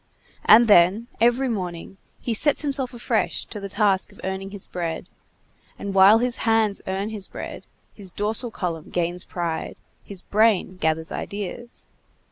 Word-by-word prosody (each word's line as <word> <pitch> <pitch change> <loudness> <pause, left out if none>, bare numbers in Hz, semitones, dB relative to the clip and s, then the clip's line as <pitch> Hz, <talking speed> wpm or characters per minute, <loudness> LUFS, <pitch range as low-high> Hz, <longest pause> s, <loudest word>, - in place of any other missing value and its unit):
And 230 +2 +8
then, 205 +4 +5
every 240 +3 +3
morning, 185 -4 -4 0.2
he 235 - -2
sets 290 +7 +2
himself 275 -3 0
afresh 240 -2 -1
to 210 - -6
the 200 0 -6
task 200 -1 +1
of 200 - -19
earning 190 +1 -4
his 195 -1 -6
bread; 170 -2 -4 0.7
and 200 -1 -5
while 195 +3 +7
his 245 +1 0
hands 225 -3 +2
earn 195 +2 -2
his 210 -3 -1
bread, - - -8 0.3
his 195 -3 -7
dorsal 220 +5 -2
column 170 -7 -4
gains 175 +1 -2
pride, 170 -2 -4 0.3
his 195 -2 -8
brain 210 -3 +2
gathers 160 -1 -1
ideas. 210 +4 -6
200 Hz, 150 wpm, -23 LUFS, 185-225 Hz, 0.7 s, And